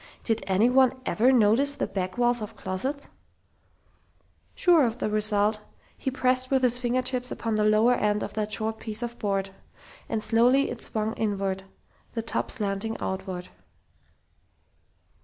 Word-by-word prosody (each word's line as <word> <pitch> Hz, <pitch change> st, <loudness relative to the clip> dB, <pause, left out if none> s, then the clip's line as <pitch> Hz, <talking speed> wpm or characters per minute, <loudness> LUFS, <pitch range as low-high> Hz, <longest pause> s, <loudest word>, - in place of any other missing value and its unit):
Did 225 Hz, -2 st, 0 dB
anyone 250 Hz, +7 st, +3 dB
ever 245 Hz, +2 st, +3 dB
notice 250 Hz, +4 st, +3 dB
the -, -, -1 dB
back 185 Hz, 0 st, -4 dB
walls 240 Hz, -1 st, +2 dB
of 210 Hz, -, -7 dB
closets? 260 Hz, +10 st, -3 dB, 1.4 s
Sure 345 Hz, -5 st, +4 dB
of 230 Hz, -1 st, -1 dB
the 215 Hz, -, -2 dB
result, 210 Hz, 0 st, +2 dB, 0.4 s
he -, -, -3 dB
pressed 255 Hz, 0 st, 0 dB
with 265 Hz, -1 st, +1 dB
his 245 Hz, -1 st, +4 dB
finger 250 Hz, +1 st, 0 dB
tips 250 Hz, -1 st, -2 dB
upon 225 Hz, -1 st, -3 dB
the 215 Hz, 0 st, +1 dB
lower 215 Hz, +3 st, +4 dB
end 210 Hz, -2 st, 0 dB
of -, -, -6 dB
that 215 Hz, -1 st, -3 dB
short 220 Hz, 0 st, -2 dB
piece 220 Hz, +1 st, -4 dB
of 240 Hz, 0 st, -6 dB
board. 195 Hz, -2 st, -1 dB, 0.6 s
And 215 Hz, -1 st, -1 dB
slowly 245 Hz, +4 st, +3 dB
it 240 Hz, -, -6 dB
swung 220 Hz, 0 st, -1 dB
inward, 195 Hz, -3 st, -2 dB, 0.5 s
the 225 Hz, -, -2 dB
top 230 Hz, -, -3 dB
slanting 210 Hz, -1 st, -1 dB
outward. 190 Hz, -1 st, -5 dB
225 Hz, 150 wpm, -26 LUFS, 210-250 Hz, 1.4 s, Sure